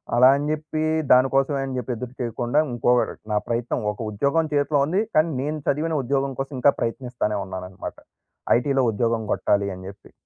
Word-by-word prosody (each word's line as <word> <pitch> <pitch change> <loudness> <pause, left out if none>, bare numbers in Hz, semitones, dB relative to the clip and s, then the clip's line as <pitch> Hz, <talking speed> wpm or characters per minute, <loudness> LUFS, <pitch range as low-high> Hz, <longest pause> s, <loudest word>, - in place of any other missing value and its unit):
అలా 125 +2 +7
అని 140 +1 -2
జెప్పి 155 0 -2 0.3
దానికోసమే 135 +2 +4
అని 135 -1 -5
జెప్పి 125 0 -3
ఎదురు 125 +2 -7
చేయకుండా 120 +3 0
ఇంకోరు 120 +1 +1 0.2
నా 105 - +2
ప్రయత్నం 120 +1 -1
ఒక 105 - -12
ఉద్యోగం 140 +10 +1
చేతిలో 145 0 +2
ఉంది 185 +6 +1
కానీ 155 +2 +4
నేను 150 +3 -2
చదివిన 155 +3 0
ఉద్యోగం 135 +1 0
కోసం 135 +1 -6
ఇంకా 140 +3 +5
ప్రయత్నిస్తానే 115 -3 -2
ఉన్నానన్నమాట 95 -1 -7 0.6
ఐటీలో 135 +2 +1
ఉద్యోగం 115 +1 0
గొట్టాలి 100 -1 +1
అని 95 - -11
జెప్పి. 100 - -15
130 Hz, 165 wpm, -23 LUFS, 115-145 Hz, 0.6 s, అలా